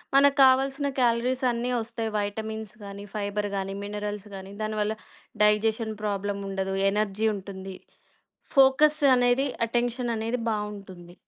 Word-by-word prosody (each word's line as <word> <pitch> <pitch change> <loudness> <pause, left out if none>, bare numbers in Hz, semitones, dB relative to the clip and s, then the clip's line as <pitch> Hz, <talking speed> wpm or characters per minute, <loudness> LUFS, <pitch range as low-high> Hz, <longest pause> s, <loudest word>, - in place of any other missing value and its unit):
మనకు 280 +1 +5
కావాల్సిన 270 +2 +3
క్యాలరీస్ 245 +2 +1
అన్నీ 240 +1 -2
ఒస్తాయి 225 0 -4
వైటమిన్స్ 220 +1 -4
గానీ, 200 0 -8
ఫైబర్ 205 0 -2
గానీ, 195 0 -3
మినరల్స్ 205 0 -5
గానీ, 190 0 -9
దానివల్ల 215 0 -1 0.5
డైజెషన్ 220 +1 +2
ప్రాబ్లమ్ 200 -1 -2
ఉండదు. 195 0 -2 0.2
ఎనర్జీ 210 +1 0
ఉంటుంది. 190 -1 -8 0.8
ఫోకస్ 290 +3 +5 0.2
అనేది 245 +3 +3 0.2
అటెన్షన్ 240 +1 -1
అనేది 225 +3 -1
బావుంటుంది. 200 -5 -5
215 Hz, 115 wpm, -26 LUFS, 200-245 Hz, 0.8 s, మనకు